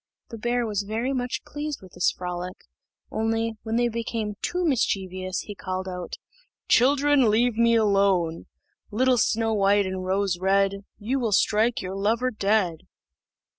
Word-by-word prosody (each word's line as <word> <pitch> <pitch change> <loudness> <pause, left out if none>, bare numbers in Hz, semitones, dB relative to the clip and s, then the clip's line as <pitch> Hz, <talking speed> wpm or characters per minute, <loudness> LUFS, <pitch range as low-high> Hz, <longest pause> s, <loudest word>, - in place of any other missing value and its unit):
The 230 - -8
bear 240 +1 0
was 210 -2 -1
very 225 +6 -2
much 250 -1 -3
pleased 295 -1 -5
with 185 - -13
this - - +2
frolic, 180 0 -5 0.5
only, 225 +1 0
when 225 0 -3
they 240 0 +3
became 230 -2 -3
too 360 0 -1
mischievous, 185 - -1
he 205 - -8
called 185 -1 -4
out, 180 -1 -5 0.5
"Children, 275 0 +4
leave 230 +2 +2
me 230 0 +4
alone." 195 -6 +2 0.4
"Little 250 +3 +2
Snow 225 0 +1
white 200 0 +3
and 185 0 -4
Rose 190 -1 0
red, 195 +1 +1
You 240 +6 -1
will 230 -4 -1
strike 215 +3 +2
your 185 +1 -4
lover 225 +6 +1
dead." 200 -6 +1
215 Hz, 150 wpm, -25 LUFS, 190-235 Hz, 0.5 s, Children